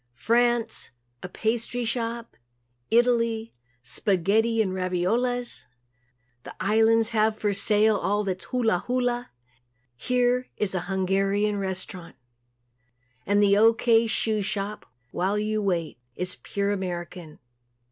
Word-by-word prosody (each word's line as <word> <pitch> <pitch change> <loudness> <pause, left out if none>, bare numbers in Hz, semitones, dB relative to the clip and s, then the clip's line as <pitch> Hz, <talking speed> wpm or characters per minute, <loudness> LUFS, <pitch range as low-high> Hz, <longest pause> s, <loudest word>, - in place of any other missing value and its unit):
France 235 - +1 0.3
a 180 - -7
pastry 230 +4 -2
shop. 235 0 -3 0.5
Italy 230 -1 +2 0.3
spaghetti 200 - +1
and 195 -4 +1
raviolas. 210 +7 -1 0.8
The - - -11
Islands 225 +2 +3
have 220 -1 +1
for 205 -2 0
sale 210 +2 +3
all 205 +1 0
that's 185 -2 -4
hula 225 -8 +1
hula. 245 -1 -1 0.7
Here 250 - +1
is 205 -2 0
a 185 - 0
Hungarian 195 +2 +1
restaurant. 185 -2 -5 1.1
And 205 +1 +3
the 200 0 +5
"O. 225 +2 +6
K. 230 0 +3
Shoe 220 0 0
Shop 200 +1 -4 0.2
While 195 +3 0
U 215 0 -1
Wait" 170 -9 -2 0.2
is 180 0 -3
pure 200 0 -2
American. 175 -4 -5
210 Hz, 115 wpm, -25 LUFS, 190-230 Hz, 1.1 s, O